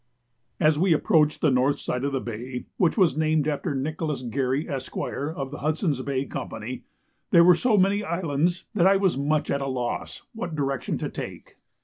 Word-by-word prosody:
As 155 -1 +3
we 180 -1 +4
approached 155 -1 +2
the 150 - +4
north 130 +3 +2
side 125 - -3
of 140 - 0
the 135 - 0
bay, 125 +2 -6
which 175 +2 +2
was 185 -8 +4
named 155 -1 +1
after 150 0 -1
Nicholas 150 0 -2
Garry, 130 +4 -1
Esq., 135 -4 -5
of 140 -2 -3
the 145 - -7
Hudson's 155 -2 0
Bay 135 0 -2
Company, 115 -1 -6 0.4
there 170 - +7
were 180 +1 +8
so 215 +5 +2
many 200 +2 +3
islands 170 -1 -1
that 175 - +4
I 195 0 +5
was 190 -2 +2
much 150 +2 0
at 140 - 0
a 135 - -2
loss 125 -2 -3
what 180 -8 -5
direction 135 -3 -1
to - - -3
take. - - -8
150 Hz, 190 wpm, -25 LUFS, 135-170 Hz, 0.4 s, were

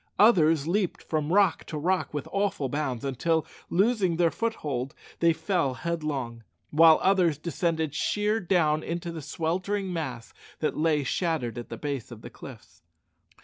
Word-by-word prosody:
Others 165 -8 +5
leaped 185 +1 0
from 155 -1 -2
rock 195 -3 +3
to 155 - -5
rock 180 +5 0
with 145 -2 -4
awful 195 -9 0
bounds, 140 -3 -2
until, 160 +4 0 0.2
losing 195 -2 +2
their 170 -1 +3
foothold, 145 - -3 0.2
they 170 0 +5
fell 160 -4 0
headlong; 140 -6 -3 0.3
while 160 +1 +7
others 185 -6 +3
descended 160 -1 -1
sheer 210 +7 0
down 165 -5 +2
into 170 +1 -4
the 165 -1 -6
sweltering 185 +6 -2
mass 130 -9 -5 0.2
that 155 - -1
lay 155 -2 +2
shattered 135 - -1
at 120 - -8
the - - -6
base 140 -5 -4
of 115 -3 -10
the - - -9
cliffs. - - -13
160 Hz, 150 wpm, -27 LUFS, 145-180 Hz, 0.3 s, while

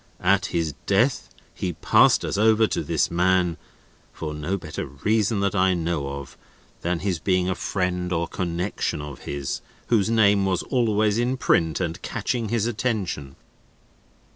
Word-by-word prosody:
At - - +3
his 80 -3 -1
death, 115 +7 +2 0.2
he 90 - -3
passed - - +4
us - - -2
over 110 +2 +4
to - - -1
this - - 0
man; 90 -1 +2 0.5
for 75 -2 -5
no 75 +6 -2
better 80 -4 -6
reason 105 - 0
that 100 -1 +1
I 95 -1 +3
know 80 -5 -2
of, 70 -1 -9 0.4
than 85 -1 -1
his 95 -4 -1
being 90 +1 +1
a 95 - +1
friend 90 -1 -2
or 85 -1 0
connexion 90 -2 -2
of 75 -1 -7
his, 70 -1 -3 0.3
whose 110 -3 +3
name 105 -3 +4
was 95 -2 0
always 110 -3 +1
in 125 +2 0
print 80 -10 +2
and 85 -3 -3
catching 115 -4 -2
his 115 -1 +1
attention." 105 - -2
95 Hz, 155 wpm, -24 LUFS, 85-105 Hz, 0.5 s, passed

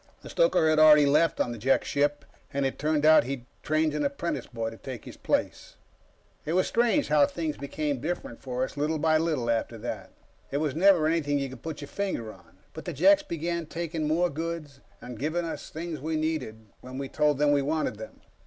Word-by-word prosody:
The - - -9
stoker - - +3
had 155 0 +3
already 150 -1 +8
left 150 +3 +3
on 120 - 0
the 120 - -6
Jek 135 +5 +2
ship, 145 0 0 0.3
and 140 0 -1
it 135 - -2
turned 150 0 +1
out 155 0 +7
he'd 130 -2 -5 0.2
trained 155 0 +1
an 150 0 -1
apprentice 140 +4 -2
boy 115 -2 -4
to 115 - -11
take 130 -4 -8
his - - -9
place. - - -2 0.7
It 155 - -3
was 185 +1 +3
strange 240 +5 +1
how 150 -1 +5
things 160 -3 -3
became 140 -1 -3
different 155 -7 -4
for 130 -1 -2
us, - - -4
little 155 +2 0
by 155 +1 +3
little 155 -7 -1
after 115 0 -1
that. 115 +3 -6 0.4
It 140 - -2
was 150 -2 -1
never 180 -1 +5
anything 155 -3 +1
you 140 -1 -2
could 130 - -11
put 160 -2 -6
your 145 - -7
finger 160 - -3
on, 90 0 -21 0.2
but 160 - -9
the 175 - -4
Jeks 295 - +5
began 170 - -3
taking 165 -2 -3
more 170 +3 +1
goods, 160 -3 -5 0.2
and 125 -3 -9
giving 160 +4 -1
us 165 - -6
things 160 -2 -6
we 160 +2 -2
needed 150 -9 -3
when 130 +1 -9
we 135 0 -4
told 150 +1 +1
them 145 0 +3
we 145 -1 +3
wanted 150 -5 -1
them. 110 - -10
150 Hz, 215 wpm, -27 LUFS, 135-160 Hz, 0.7 s, already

